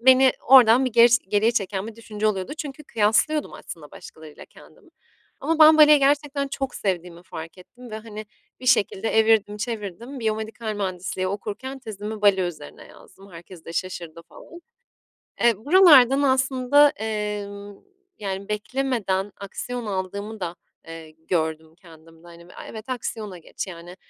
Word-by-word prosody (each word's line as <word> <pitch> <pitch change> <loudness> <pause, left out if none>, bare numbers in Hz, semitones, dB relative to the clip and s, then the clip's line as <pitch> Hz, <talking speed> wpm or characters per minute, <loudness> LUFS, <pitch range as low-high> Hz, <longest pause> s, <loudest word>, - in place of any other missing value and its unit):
beni 260 +1 +6 0.2
oradan 255 -1 +7
bir 255 - -2
gers 235 +1 +6
geriye 205 +2 +1
çeken 195 -2 -2
bir 225 - -9
düşünce 215 -2 -4
oluyordu 195 +2 -2
çünkü 295 0 -7
kıyaslıyordum 230 +7 +1
aslında 150 -3 -10
başkalarıyla 155 -2 -13
kendimi. - - -20 0.5
Ama 325 0 -1
ben 310 0 +8
baleyi 300 -1 +8
gerçekten 280 0 +1
çok 270 -1 -4
sevdiğimi 175 -3 -4
fark 165 0 -9
ettim 245 +6 -14
ve, 215 - -5
hani, 215 -1 -9 0.3
bir 255 - -9
şekilde 225 -3 +2
evirdim 220 -2 +2
çevirdim. 225 +3 -6
Biyomedikal 220 0 -3
mühendisliği 185 -2 -3
okurken 215 +7 -6
tezimi 215 -3 -7
bale 200 -2 +4
üzerine 160 -5 -7
yazdım, 195 0 -18
herkes 170 0 -13
de 165 - -8
şaşırdı 170 -2 -5
falan. 335 - -15 0.8
Eee, 235 0 +5
buralardan 285 - +6
aslında, 265 +1 +3
emm, 210 -3 -5 0.4
yani, 195 -1 -5
beklemeden 210 -3 -2
aksiyon 240 +4 -6
aldığımı 200 +2 -5
da, 175 -2 -4 0.3
eee, 165 -1 -10
gördüm 160 0 -3
kendimde. 165 -1 -18
Hani, 170 0 -15
b - - -16
"A, - - -10
evet, 220 +3 -10
aksiyona 220 -6 -5
geç." 170 - -7
yani, 175 0 -10
210 Hz, 145 wpm, -23 LUFS, 185-250 Hz, 0.8 s, ben